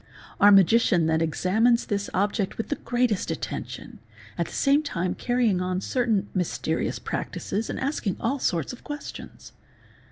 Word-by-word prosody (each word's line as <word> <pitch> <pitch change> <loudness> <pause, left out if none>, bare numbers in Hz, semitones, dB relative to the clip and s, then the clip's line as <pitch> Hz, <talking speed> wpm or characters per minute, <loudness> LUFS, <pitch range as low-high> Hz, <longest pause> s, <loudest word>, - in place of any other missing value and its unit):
Our 205 - +7
magician 195 -3 +5
then 160 0 +1
examines 215 +9 +2
this 200 0 -2
object 200 +1 -1
with 225 - -4
the 290 - 0
greatest 240 -4 0
attention, - - -5 0.4
at - - -1
the - - -11
same 280 +1 +3
time 185 - -2
carry 245 -1 0
ing 185 -4 +1
on 185 0 -1
certain 225 -1 0
mysterious 180 -3 -1
practices 215 +3 -4
and - - -3
asking 260 - -2
all 270 +5 -1
sorts 170 - -1
of 250 - -12
questions. 295 0 -8
205 Hz, 155 wpm, -25 LUFS, 185-245 Hz, 0.4 s, Our